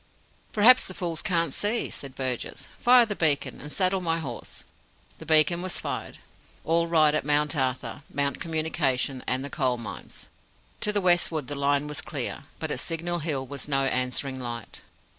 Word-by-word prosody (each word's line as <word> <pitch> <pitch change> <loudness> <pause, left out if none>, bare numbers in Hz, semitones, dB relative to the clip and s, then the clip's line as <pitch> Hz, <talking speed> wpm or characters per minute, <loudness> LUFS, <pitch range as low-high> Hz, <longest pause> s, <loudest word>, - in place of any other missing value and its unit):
"Perhaps 235 +4 +6
the 185 - -7
fools 170 -3 -2
can't 165 -5 0
see," 215 +3 +1
said 135 -1 -6
Burgess. 130 -2 -3
"Fire 245 0 +6
the 210 -2 -4
beacon 150 -5 0
and 150 - -7
saddle 185 +1 +1
my 165 -2 0
horse." 135 -8 -7 0.6
The 160 - -11
beacon 160 +2 +5
was 185 0 +1
fired. - - -5 0.5
All 170 +1 +2
right 155 -3 +4
at 155 - 0
Mount 150 +2 +1
Arthur, 130 0 -2
Mount 140 -1 -1
Communication, 140 -5 0
and 130 +2 0
the - - -5
Coal 130 -3 0
Mines. 115 -2 -8 0.5
To 210 - 0
the 205 -1 +1
westward 175 -5 +2
the - - -2
line 140 +1 +1
was 150 +1 -2
clear. 140 -2 -4
But 160 -1 -4
at - - -2
Signal 170 +1 -1
Hill 145 -4 -2
was 140 +1 -5
no 135 -2 +2
answering 130 +1 -1
light. 120 -4 -6
150 Hz, 175 wpm, -26 LUFS, 135-170 Hz, 0.6 s, Perhaps